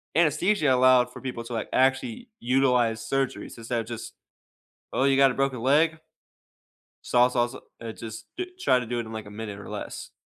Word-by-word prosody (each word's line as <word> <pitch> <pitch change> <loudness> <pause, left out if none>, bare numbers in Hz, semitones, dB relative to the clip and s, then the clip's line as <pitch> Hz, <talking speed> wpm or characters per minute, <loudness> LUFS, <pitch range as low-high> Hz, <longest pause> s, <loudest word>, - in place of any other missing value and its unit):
Anesthesia 165 +2 +3
allowed 130 -1 +5
for - - -10
people 125 -3 -5
to, - - -9
like, 110 - -2
actually 180 - +1
utilize 125 -3 +2
surgeries, 135 -2 -2
instead 115 +1 -2
of - - -8
just 115 0 -7 0.8
"Oh, 135 - +2
you 135 -1 +4
got 135 -1 +6
a - - -4
broken 135 -3 -1
leg?" 155 +5 +3 1.0
Saw, 125 0 +4
saw, 120 -1 +2
s 120 - -10 0.3
and 115 -1 -6
it, - - -11
just 110 -1 -8
d 365 - -2
try 130 - +3
to 125 - -4
do 120 +1 -3
it 115 - -3
in, 110 - -9
like, 110 -1 -6
a 105 - -10
minute 105 -1 -6
or 100 - -10
less, - - -6
125 Hz, 205 wpm, -26 LUFS, 115-135 Hz, 1.0 s, got